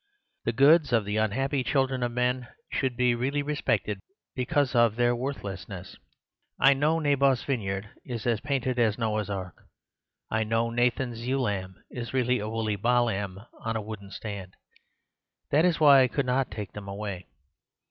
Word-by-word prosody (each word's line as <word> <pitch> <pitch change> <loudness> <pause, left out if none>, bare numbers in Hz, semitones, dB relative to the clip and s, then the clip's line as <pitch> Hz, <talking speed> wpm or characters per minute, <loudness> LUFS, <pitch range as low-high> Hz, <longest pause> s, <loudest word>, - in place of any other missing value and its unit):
The 115 - +2
goods 140 +4 +5
of 115 -4 +3
the 105 +1 -2
unhappy 130 +6 0
children 135 -1 +1
of 120 -1 0
men 125 +1 0 0.2
should 130 -3 -1
be 125 -1 +3
really 135 +4 -1
respected 110 -9 -1 0.3
because 135 +1 0
of 120 -3 +4
their 120 0 +2
worthlessness. 100 -7 -6 0.6
I 135 - +7
know 150 +4 +2
Naboth's 140 -4 +2
vineyard 100 -6 -2 0.2
is 120 -4 -5
as 115 -2 +2
painted 130 -3 -1
as 110 -3 +2
Noah's 110 -3 -1
Ark. 95 -3 -6 0.6
I 110 0 +1
know 115 +1 0
Nathan's 120 0 0
ewe 135 +1 +1
lamb 95 -5 -2 0.2
is 120 0 -5
really 125 -1 +2
a 105 +1 -4
woolly 110 -2 -1
baa 120 +4 +3
lamb 100 -2 -3 0.2
on 115 0 -2
a 110 - -1
wooden 105 -2 -8
stand. 100 -3 -7 1.0
That 155 +4 +4
is 175 -3 +2
why 140 -3 +8
I 130 - +5
could 135 +2 -1
not 130 +1 +1
take 105 -1 -6
them 105 -1 -9
away. 100 -3 -5
120 Hz, 170 wpm, -27 LUFS, 105-130 Hz, 1.0 s, why